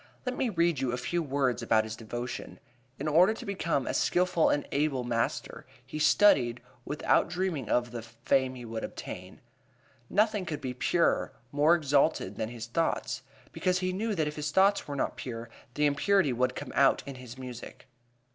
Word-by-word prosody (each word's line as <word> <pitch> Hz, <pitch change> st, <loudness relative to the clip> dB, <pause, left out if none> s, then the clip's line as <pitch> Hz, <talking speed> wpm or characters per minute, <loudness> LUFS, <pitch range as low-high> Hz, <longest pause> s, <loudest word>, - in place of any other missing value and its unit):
Let 250 Hz, 0 st, -2 dB
me 255 Hz, -2 st, 0 dB
read 170 Hz, -, +1 dB
you 130 Hz, -2 st, 0 dB
a 125 Hz, -, -2 dB
few 170 Hz, +7 st, -1 dB
words 135 Hz, -4 st, 0 dB
about 110 Hz, -1 st, +3 dB
his 110 Hz, 0 st, -6 dB
devotion: 120 Hz, +2 st, -6 dB, 0.4 s
"In 145 Hz, -, -4 dB
order 180 Hz, +8 st, +5 dB
to -, -, -9 dB
become 170 Hz, -8 st, -1 dB
a -, -, -2 dB
skilful 180 Hz, -2 st, +2 dB
and 145 Hz, -, 0 dB
able 140 Hz, -3 st, 0 dB
master 115 Hz, -1 st, -2 dB, 0.2 s
he 150 Hz, +4 st, -6 dB
studied, 140 Hz, -, +4 dB, 0.3 s
without -, -, +2 dB
dreaming 175 Hz, -, -2 dB
of 120 Hz, -1 st, +1 dB
the... 120 Hz, -1 st, -5 dB
fame 130 Hz, +3 st, 0 dB
he 120 Hz, -1 st, -8 dB
would 115 Hz, -1 st, -5 dB
obtain." -, -, -8 dB, 0.7 s
"Nothing 210 Hz, 0 st, +2 dB
could 150 Hz, -3 st, -3 dB
be 130 Hz, -1 st, -4 dB
purer, 165 Hz, +7 st, +1 dB, 0.2 s
more 150 Hz, +4 st, +5 dB
exalted, 145 Hz, -, +1 dB
than 110 Hz, -, -2 dB
his 115 Hz, -1 st, -7 dB
thoughts," 165 Hz, +8 st, -1 dB, 0.3 s
because 185 Hz, -1 st, 0 dB
he 185 Hz, 0 st, -1 dB
knew 215 Hz, +3 st, -1 dB
that 155 Hz, -4 st, 0 dB
if 150 Hz, -, -5 dB
his 150 Hz, 0 st, -2 dB
thoughts 195 Hz, +5 st, +3 dB
were 145 Hz, -, -4 dB
not 135 Hz, -, -2 dB
pure 115 Hz, -2 st, -6 dB, 0.2 s
the 150 Hz, -, +2 dB
impurity 145 Hz, +1 st, +3 dB
would 125 Hz, +1 st, 0 dB
come -, -, -6 dB
out 135 Hz, 0 st, +4 dB
in 140 Hz, -, -6 dB
his 125 Hz, -1 st, -10 dB
music. 125 Hz, -2 st, -9 dB
140 Hz, 185 wpm, -29 LUFS, 120-175 Hz, 0.7 s, order